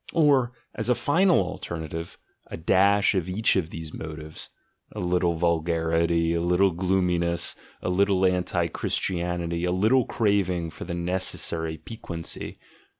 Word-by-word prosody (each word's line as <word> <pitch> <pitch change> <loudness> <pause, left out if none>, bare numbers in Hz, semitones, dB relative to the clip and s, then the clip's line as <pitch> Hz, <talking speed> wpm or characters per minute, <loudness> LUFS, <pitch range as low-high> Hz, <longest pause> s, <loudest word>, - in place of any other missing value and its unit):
or, 140 -6 +4 0.2
as - - -2
a 125 - +4
final 170 +9 +3
alternative. 80 -2 -5 0.3
a - - -7
dash 100 +5 +3
of 95 -2 -1
each 105 +4 +2
of 90 -4 0
these 80 -1 -8
motives; 80 -1 -7 0.2
— - - -45
a - - -4
little 90 -1 +1
vulgarity, 85 0 +1
a 85 - 0
little 90 +3 +3
gloominess, 90 -1 0 0.3
a - - -1
little 95 0 +3
anti 90 -1 +1
Christianity, 85 -1 -2
a 90 - +1
little 110 +7 +3
craving 90 -6 0
for - - -8
the 85 0 -4
necessary 85 -2 -1
piquancy? 85 -1 -6
90 Hz, 140 wpm, -26 LUFS, 85-95 Hz, 0.3 s, or